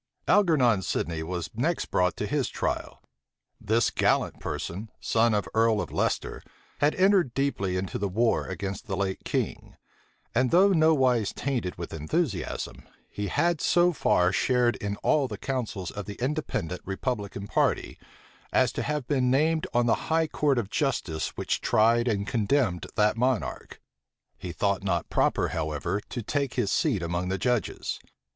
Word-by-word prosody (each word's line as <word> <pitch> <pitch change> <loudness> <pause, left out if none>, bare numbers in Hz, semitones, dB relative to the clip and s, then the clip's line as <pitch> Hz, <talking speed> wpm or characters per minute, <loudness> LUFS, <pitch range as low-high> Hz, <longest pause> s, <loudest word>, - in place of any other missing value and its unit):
Algernon 140 - +4
Sidney 85 -2 -2
was 85 0 -4
next 150 +10 -1
brought 90 -1 +2
to - - -2
his - - -1
trial. - - -3 0.6
This 115 +2 +1
gallant - - +1
person, 100 +6 -5
son 115 -1 +2
of 105 - +1
the - - -12
earl 110 -1 +3
of - - -4
Leicester, - - -1 0.4
had 145 +1 +3
entered 185 - +3
deeply 100 -10 0
into 95 +1 -3
the 100 - 0
war 115 +5 +1
against 100 +4 -5
the 95 -3 -2
late 95 -1 -2
king; - - -3 0.6
and 130 +2 +2
though 190 +7 +5
nowise 135 - +3
tainted 125 -10 -2
with 85 -1 -6
enthusiasm, 115 - -2 0.3
he 105 0 -3
had 170 - +1
so 175 0 +3
far 90 - +2
shared 120 +5 +2
in 100 0 -3
all 145 -3 +3
the 105 -4 -6
counsels 110 -8 -3
of 105 -1 -6
the 100 - -7
Independent 125 - -2
republican 100 -1 -3
party, - - 0 0.5
as - - +3
to - - -3
have 150 -3 -2
been 130 -4 +2
named 155 +4 +2
on 120 0 +2
the 115 - 0
high 160 0 +3
court 145 -3 +1
of 110 -3 -2
justice 115 - -1
which - - -1
tried 115 +2 +3
and 100 -4 0
condemned 110 -4 0
that 105 +1 +3
monarch: 125 -1 -1 0.6
he 90 - -7
thought 100 +1 0
not 85 -4 -1
proper, - - +2
however, 80 +6 -2
to 120 - -4
take 140 +3 -1
his 115 -6 0
seat 115 - +1
among 85 +2 -2
the 95 - 0
judges. 120 -1 -1
115 Hz, 160 wpm, -27 LUFS, 95-140 Hz, 0.6 s, though